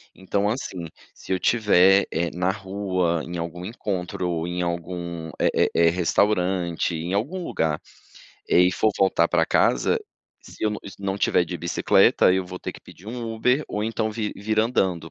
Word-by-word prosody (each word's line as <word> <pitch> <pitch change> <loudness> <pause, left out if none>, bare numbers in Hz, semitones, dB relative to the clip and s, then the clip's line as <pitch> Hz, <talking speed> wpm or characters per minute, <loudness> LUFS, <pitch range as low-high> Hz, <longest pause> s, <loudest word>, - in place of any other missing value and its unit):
Então 100 +2 -1
assim, 95 -7 -4 0.3
se - - -10
eu 95 - +1
tiver, 100 -4 +4
eh, 85 +1 0
na 90 +2 0
rua, 95 -4 -1
em 85 +1 -5
algum 85 +1 -5
encontro 95 -4 -3
ou 85 -1 -2
em 90 0 -3
algum, 85 -1 -4
eh - - +3
eh - - +3
eh, 85 0 +5
restaurante, 90 -1 +1
em 85 +3 -4
algum 145 - -2
lugar, 80 - -1 0.7
eh, - - +5
e 90 +1 +3
for 110 - +2
voltar 95 -3 +3
pra 80 -2 +2
casa, - - +2 0.4
se - - -13
eu 105 - +2
não 105 - -4 0.2
não 100 0 -3
tiver 90 - +2
de 90 +1 -5
bicicleta, 85 +1 +3
eu 95 0 0
vou 90 0 -8
ter - - -5
que - - -13
pedir 95 - -16
um 115 -1 -5
Uber, 125 +6 +2
ou 105 - -3
então 110 0 -1
vir 105 -1 -3
vir 110 +2 -2
andando, 95 -8 0
90 Hz, 185 wpm, -24 LUFS, 85-105 Hz, 0.7 s, eh